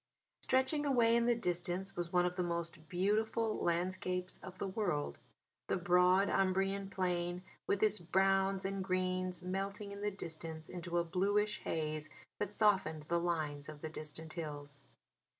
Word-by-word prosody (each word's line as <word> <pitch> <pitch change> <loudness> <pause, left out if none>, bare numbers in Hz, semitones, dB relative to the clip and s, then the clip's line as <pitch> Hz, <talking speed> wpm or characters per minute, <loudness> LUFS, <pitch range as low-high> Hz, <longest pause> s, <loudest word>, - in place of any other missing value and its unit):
Stretching 260 +3 +2
away 240 -5 +4
in 235 0 +3
the 240 - +4
distance 180 -2 -1
was 175 -1 -3
one 180 -1 +4
of 180 0 -1
the 180 - 0
most 170 -2 -3
beautiful 215 +4 +1
landscapes 180 +1 -1
of 185 0 -9
the 195 - -2
world; 175 - -1 0.5
the - - +1
broad 180 +2 +4
Umbrian 195 +1 +1
Plain 180 -1 -1 0.2
with 200 - +2
its 215 -1 +4
browns 195 +2 +2
and 195 0 -1
greens 185 -1 0
melting 195 +3 -3
in 200 0 -7
the 210 - +1
distance 160 -4 -6
into 175 -1 -3
a 170 - +3
bluish 205 +4 +1
haze 155 -1 -2 0.3
that 205 -1 -1
softened 195 -8 +2
the 170 +3 +1
lines 155 -4 -1
of 150 -1 -9
the 160 - -4
distant 155 0 -6
hills. 145 -3 -5
185 Hz, 155 wpm, -35 LUFS, 170-195 Hz, 0.5 s, away